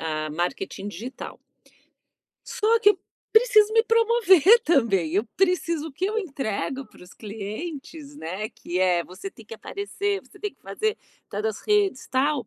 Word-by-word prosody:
a 155 -1 -2
marketing 185 - -3
digital. 225 +7 -8 1.1
Só 455 +2 +2
que 415 - +7
eu 370 - -1 0.3
preciso 440 -2 +5
me 450 0 +5
promover 455 -3 +5
também, 195 - +2
eu 205 +4 +2
preciso. 335 -4 +1
O 290 - -13
que 340 +7 -3
eu 440 +2 -1
entrego 270 - -3
para - - -18
os 180 - -14
clientes, 275 - -7
né, 195 - -4
que 180 -6 -5
é 180 -2 +3
você 185 - -8
tem 225 - -15
que 225 - -9
aparecer, 400 - -3
você - - -19
tem 415 - -4
que - - -39
fazer 435 -1 -2 0.3
tal 205 +1 -4
das 220 -2 -2
redes, 410 -9 +1
tal. 265 -2 +1
285 Hz, 165 wpm, -25 LUFS, -, 1.1 s, que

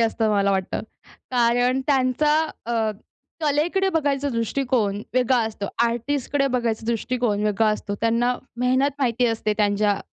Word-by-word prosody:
असतं 225 -1 +1
मला 200 -1 +2
वाटतं. 190 -1 -1 0.5
कारण 245 +1 +2
त्यांचा 275 +2 +2 0.3
अ, 225 -2 0 0.5
कलेकडे 325 +7 +1
बघायचा 285 -4 0
दृष्टिकोन 230 -3 -1
वेगळा 255 0 +3
असतो. 210 -2 -5 0.2
आर्टिस्टकडे 275 +4 -1
बघायचा 230 -2 -2
दृष्टिकोन 235 -2 -1
वेगळा 215 +1 +2
असतो. 210 -1 -2
त्यांना 235 +2 +1 0.2
मेहनत 260 +3 +2
माहिती 245 -2 +1
असते 225 -2 0
त्यांच्या 205 -1 +1
235 Hz, 125 wpm, -23 LUFS, 220-265 Hz, 0.5 s, वेगळा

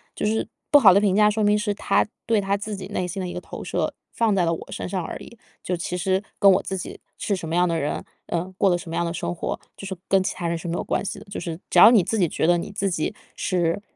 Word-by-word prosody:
就 - - -2
是 220 +1 0 0.2
不 290 - +8
好 200 -8 +8
的 200 - +4
评 200 -3 +2
价， 210 +1 +5
说 215 +1 0
明 210 0 +3
是 210 -1 -1
他 205 - +1 0.2
对 225 -2 +2
他 195 0 0
自 205 0 -4
己 190 - -7
内 180 - -2
心 180 +2 -4
的 185 - -3
一 175 - -5
个 180 - -5
投 - - -9
射 - - -2 0.2
放 225 -2 +2
在 185 -3 +2
了 165 - +1
我 165 - -7
身 - - -4
上 185 -1 -2
而 - - -5
已。 235 - -12 0.2
就 180 - -2
其 175 +1 -3
实 190 +2 0 0.2
跟 200 - +7
我 185 - +1
自 190 - -3
己 180 - -7 0.2
是 205 - -1
什 175 -3 -6
么 160 - -2
样 180 +1 +4
的 165 -1 0
人， 150 0 -2 0.2
嗯， 175 +2 -3
过 195 - +4
着 175 - +3
什 175 -1 -9
么 165 - -4
样 170 0 0
的 170 - -2
生 175 - -3
活， 175 - -3 0.2
就 - - -8
是 190 - -4
跟 195 -1 +4
其 - - -1
他 175 - -3
人 170 - -1
是 165 - -7
没 170 - -2
有 - - -2
关 - - -1
系 200 - -4
的， 210 - -13
就 - - -4
是 165 -3 -5
只 180 - +4
要 - - +11
你 220 -6 +5
自 210 +5 -1
己 180 - +4
觉 155 - -1
得 175 0 +5
你 170 - -4
自 195 0 -1
己 160 +3 -1 0.2
是 175 0 0
185 Hz, 330 characters per minute, -24 LUFS, 175-205 Hz, 0.2 s, 要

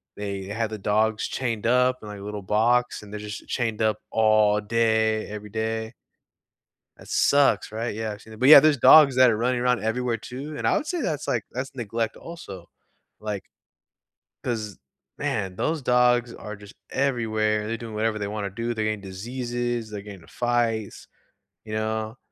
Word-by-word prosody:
they 100 -1 -4
had 110 +3 -2
the 110 - -5
dogs 110 +2 +1
chained 115 -5 -3
up 125 +1 +3
in, - - -8
like, 105 -1 -8
a - - -10
little 105 0 -5
box 120 +5 +2
and 105 - -12
they're 105 - -5
just 105 -1 -8
chained 115 -4 -2
up 110 -1 +2
all 110 -1 +3
day, 110 0 +1
every 105 0 -8
day. 110 +1 -3 1.0
That - - -15
sucks, 140 -8 +3
right? 115 +1 -3
Yeah, 110 0 -3
actually 110 +1 -11
but, 130 +4 +4
yeah, 155 - +12
there's 150 0 +4
dogs 140 +2 +8
that 130 -1 +7
are 110 - +1
running 125 +2 0
around 125 -2 +1
everywhere, 115 +1 -1
too, 135 +7 -7
and - - -1
I - - +3
would 305 - -4
say 350 -1 -2
that's, 150 - -2
like 115 - -1
that's 130 +2 -5
neglect 115 -2 -3
also, 100 - -10 0.5
like, 105 -2 -5 1.0
'cause, 110 -6 -3 0.4
man, 95 -3 -2
those 160 +5 -1
dogs 125 -1 +3
are 105 0 -8
just 100 0 -14 0.2
everywhere, 110 -5 0
they're 115 +1 -2
doing 115 -2 -8
whatever 110 0 0
they 100 -1 -3
wanna 105 -1 -4
do, 115 +4 -3
they're 110 -1 -2
getting 110 -1 -1
diseases, 120 +3 -4
they're 105 -1 -6
getting 100 -2 -10
into 80 - -18
fights. 120 -3 -1 0.6
You 110 - -7
know? 110 +1 -2
110 Hz, 180 wpm, -25 LUFS, 105-120 Hz, 1.0 s, yeah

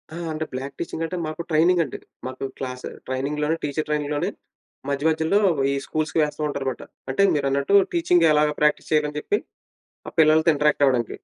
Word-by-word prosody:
ఆ! - - -6 0.2
అంటే 155 0 -3
బ్లాక్ 135 +2 -5
టీచింగంటే 170 +1 -3
మాకు 155 +2 -5
ట్రైనింగండి. 165 +1 +2 0.3
మాకు 130 +1 -5
క్లాసు 125 -1 -5 0.2
ట్రైనింగ్‌లోనే 150 +4 -1
టీచరు 150 +1 -2
ట్రైనింగ్‌లోనే 150 +4 -1 0.6
మధ్య 140 +1 -2
మధ్యలో 160 +6 +2 0.3
ఈ - - 0
స్కూల్స్‌కి 155 +1 -1
వేస్తూ 150 +1 -3
ఉంటారు 140 -2 -4
మాట. - - -9 0.3
అంటే 135 +9 +2
మీరన్నట్టు 140 +4 0 0.2
టీచింగ్ 350 +1 +3
ఎలాగా 150 0 +3
ప్రాక్టీస్ 150 0 +1
చేయాలని 150 -1 +1
చెప్పి, 415 - 0 0.7
ఆ - - -8
పిల్లలతో 155 +1 +5
ఇంటరాక్టవ్వడానికి. 140 -5 +2
150 Hz, 150 wpm, -23 LUFS, 140-160 Hz, 0.7 s, పిల్లలతో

